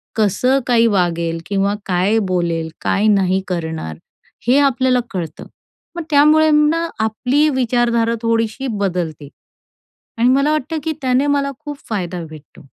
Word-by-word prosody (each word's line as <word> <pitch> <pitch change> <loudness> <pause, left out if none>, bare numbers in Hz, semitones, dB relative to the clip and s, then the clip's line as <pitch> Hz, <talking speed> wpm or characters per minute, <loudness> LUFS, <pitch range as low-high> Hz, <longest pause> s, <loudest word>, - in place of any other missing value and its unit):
कसं 225 +6 +2
काही 235 -1 +4
वागेल? 170 -4 0
किंवा 200 0 0
काय 190 +4 +1
बोलेल, 170 -3 -1
काय 210 +2 +1
नाही 190 -2 +2
करणार? 160 - -4 0.5
हे 260 +3 +5
आपल्याला 260 -2 +2
कळतं. 165 -4 -5 0.5
मग 340 - -4
त्यामुळे 305 +2 +5
ना, 305 +3 +2
आपली 250 +7 +1
विचारधारा 240 -3 +1
थोडीशी 230 +3 -1
बदलते 180 - -3 0.9
आणि 240 - +4
मला 275 +3 +3
वाटतं 310 +1 -2
की 320 - -1
त्याने 260 +2 +1
मला 280 -1 +1
खूप 295 -1 -7
फायदा 180 -5 -3
भेटतो. 155 -2 -14
225 Hz, 130 wpm, -18 LUFS, 180-270 Hz, 0.9 s, हे